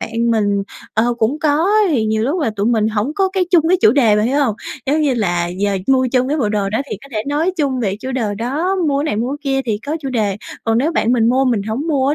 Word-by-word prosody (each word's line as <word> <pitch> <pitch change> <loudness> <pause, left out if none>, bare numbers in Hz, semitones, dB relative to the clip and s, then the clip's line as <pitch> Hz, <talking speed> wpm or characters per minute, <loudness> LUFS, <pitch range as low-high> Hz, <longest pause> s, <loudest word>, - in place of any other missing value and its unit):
bạn 230 +1 -1
mình, 205 -3 +1 0.3
ờ, 235 +2 +2
cũng 235 +7 0
có 295 -1 +2
á, 425 +3 +3
thì 235 -7 +1
nhiều 220 0 0
lúc 305 +8 0
là 255 - 0
tụi 200 +2 0
mình 220 -3 +2
hổng 220 +6 -1
có 385 +1 +2
cái 380 -2 +1
chung, 340 -4 +4
cái 370 0 +3
chủ - - +6
đề, 230 -6 +3
bạn 210 - +2
hiểu 270 +4 +1
hông? 225 -6 0 0.3
Giống 300 +3 +1
như 285 -4 +2
là, 175 -6 0
giờ 195 +2 -1
mua 260 -1 +3
chung 255 0 +2
cái 300 - 0
bộ 225 -7 +1
đồ 205 -2 -1
đó 220 - 0
thì - - -3
có 275 - -13
thể 215 -1 -2
nói 320 +6 0
chung 270 -5 0
về 200 -3 -1
chủ 260 +2 -5
đề 220 -5 -1
đó, 295 - -1
mua 280 -1 +1
cái 290 - -1
này, 210 - -1
mua 240 +4 -1
cái 285 - -3 0.2
kia 270 - +1
thì 210 -2 -1
có 310 +3 -1
chủ 275 - -4
đề. 210 -6 -1 0.3
Còn 225 0 +2
nếu 300 +7 +1
bạn 240 -6 +1
mình 230 -2 +3
mua 260 +2 +2
mình 235 -6 +1
hổng 225 +9 -3
mua 275 -3 +1
á 290 - +2
245 Hz, 295 wpm, -18 LUFS, 215-285 Hz, 0.3 s, chủ